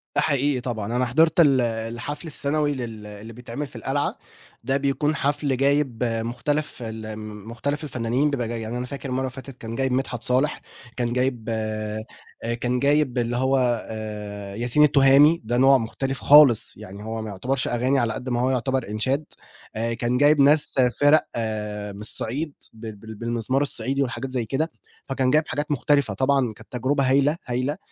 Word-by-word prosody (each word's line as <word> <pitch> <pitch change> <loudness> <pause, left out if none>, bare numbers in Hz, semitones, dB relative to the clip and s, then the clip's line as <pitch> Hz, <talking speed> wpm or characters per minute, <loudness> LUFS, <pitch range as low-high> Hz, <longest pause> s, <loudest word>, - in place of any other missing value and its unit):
ده - - +3
حقيقي 140 -3 +1
طبعًا، 115 -2 -3
أنا 125 +1 +2
حضرت 160 +7 +3
ال 140 -6 +5
الحفل 120 +7 -4
السنوي 145 0 0
لل 115 -5 -6
اللي 105 +2 -10
بتعمل 125 +4 -6
في 130 - -18
القلعة، 135 +5 -2 0.5
ده 135 +3 +1
بيكون 140 +2 0
حفل 145 -1 0
جايب 140 -3 +1
مختلف 120 +5 -2
الم 110 -2 -7
مختلف 145 +6 -3
الفنانين 125 +1 0
بيبقى 125 -5 -2
جاي 115 0 -4
يعني 110 +2 -4
أنا 125 - -3
فاكر 140 +1 -6
المرّة 130 +1 -1
اللي 130 -1 -2
فاتت 130 0 -10
كان 115 -1 -7
جايب 130 +1 0
مدحت 125 -2 -2
صالح، 130 +4 +1 0.4
كان 120 -1 -1
جايب 125 -2 -1
آآ، 110 -1 -3 0.6
كان 125 0 0
جايب 140 -1 +2
اللي 120 0 0
هو 130 +1 +2 0.3
آآ، 105 -2 -6
ياسين 120 +6 +3
التُهامي، 145 +2 +6
ده 120 +2 -1
نوع 135 +2 +6
مختلف 135 +3 -3
خالص، 145 -6 +6
يعني 105 -1 -10
هو 110 +1 -4
ما 110 - -5
يُعتبرش 125 +7 -1
أغاني 130 +3 +1
على 115 -2 0
قد 125 +4 -5
ما 120 -1 0
هو 130 - +2
يُعتبر 130 -1 -1
إنشاد 130 +8 0 0.5
آآ، 115 +1 -1
كان 120 +1 -1
جايب 145 +2 +5
ناس 145 +2 +5 0.3
فِرَق 145 +2 +6 0.7
من 100 - -10
الصعيد 140 +7 -1 0.2
بال 110 -1 -8
بال 110 +2 -10
بالمزمار 120 +4 -1
الصعيدي 135 0 0
والحاجات 130 0 -3
زي 125 -3 -1
كده، 150 +9 -1 0.3
فكان 135 -1 0
جايب 155 +2 +3
حاجات 145 +3 -3
مختلفة. 145 -1 +2
طبعًا 135 -3 +1
كانت - - -17
تجربة 130 +2 0
هايلة، 140 +4 +3
هايلة 130 +5 -2
125 Hz, 175 wpm, -24 LUFS, 115-140 Hz, 0.7 s, التُهامي